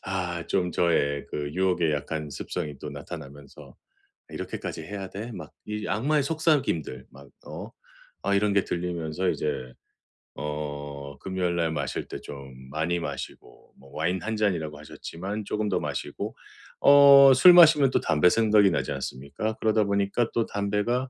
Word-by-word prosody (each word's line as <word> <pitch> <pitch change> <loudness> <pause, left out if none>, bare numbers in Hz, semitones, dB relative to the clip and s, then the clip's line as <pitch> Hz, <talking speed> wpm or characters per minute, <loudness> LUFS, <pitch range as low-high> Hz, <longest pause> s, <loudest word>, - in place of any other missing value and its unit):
아 90 -3 -3
좀 90 -2 0
저의 70 -5 +1
그 75 -1 -4
유혹에 90 -3 +1
약한 75 +1 -4
습성이 70 +1 -5
또 75 - -7
나타나면서 70 -1 -10 0.6
'이렇게까지 - - -6
해야 95 +3 -6
돼?' 110 +6 -7
막 - - -9 0.2
이 105 0 -4
악마의 145 +6 +1
속삭임들, 140 - 0
막 70 +1 -15 0.2
어 - - -8 0.5
아 100 - +1
이런 100 +1 +2
게 100 -1 +2
들리면서 85 0 -2
이제 65 -4 -3 0.7
어 75 -1 -6
금요일 95 -2 -2
날 85 -1 0
마실 80 - -3
때 - - -7
좀 70 -2 -10 0.2
많이 80 +4 -1
마시고 70 -5 -8
뭐 70 - -18
"와인 90 +3 -1
1 110 0 -2
잔"이라고 80 -8 -1
하셨지만 95 +7 -6
조금 105 +1 -2
더 - - 0
마시고. - - -4 0.5
어 140 -1 +8
술 180 +8 +9
마시면 155 -6 +7
또 - - +2
담배 80 +2 +3
생각이 105 -2 +4
나지 - - -1
않습니까? 70 +11 -4
그러다 110 -1 +2
보니까 100 +3 0
또 115 - +1
담배가 105 +6 -1
90 Hz, 300 characters per minute, -26 LUFS, 75-105 Hz, 0.7 s, 술